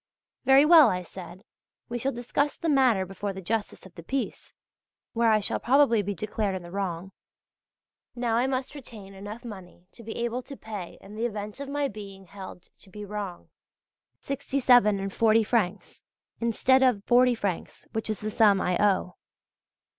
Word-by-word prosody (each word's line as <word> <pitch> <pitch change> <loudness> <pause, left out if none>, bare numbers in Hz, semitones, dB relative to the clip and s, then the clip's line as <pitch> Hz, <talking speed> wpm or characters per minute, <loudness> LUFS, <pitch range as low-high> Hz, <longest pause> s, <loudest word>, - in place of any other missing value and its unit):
"Very 270 +2 +7
well," 315 -5 +8
I 180 -2 -2
said, 180 +1 -11 0.4
"we 240 +1 -4
shall 270 +4 -1
discuss 260 +4 -1
the 335 - -3
matter 255 -9 +3
before 195 +2 -5
the 190 - -7
Justice 205 +3 -3
of 190 - -14
the 170 - -10
Peace" 265 +10 -4 0.6
(where 230 0 +3
I 215 -1 +4
shall 200 - -1
probably 245 -3 +4
be 205 0 -4
declared 210 0 -2
in 185 - -6
the 175 - -11
wrong). 190 -1 -4 1.0
Now 240 -2 0
I 245 +3 +2
must 260 +1 -2
retain 220 -8 -11
enough 205 +5 -9
money 185 -5 -10
to - - -13
be 225 0 -7
able 235 +1 -2
to 275 +2 -10
pay 205 -5 -8
in 200 - -13
the 225 +3 -1
event 210 +1 -6
of 280 -1 -6
my 285 0 0
being 195 -4 -10
held 190 -1 -11
to 195 - -13
be 210 +2 -8
wrong 200 -3 -6 0.7
67·40 225 -5 +2
francs 205 -4 -1 0.4
instead 245 +3 +3
of 245 -6 +3
40 250 0 +4
francs, 200 -6 -4
which 220 0 -3
is 215 - -3
the 215 0 -3
sum 210 -3 +4
I 180 -1 0
owe. 190 -3 +1
215 Hz, 170 wpm, -27 LUFS, 195-245 Hz, 1.0 s, well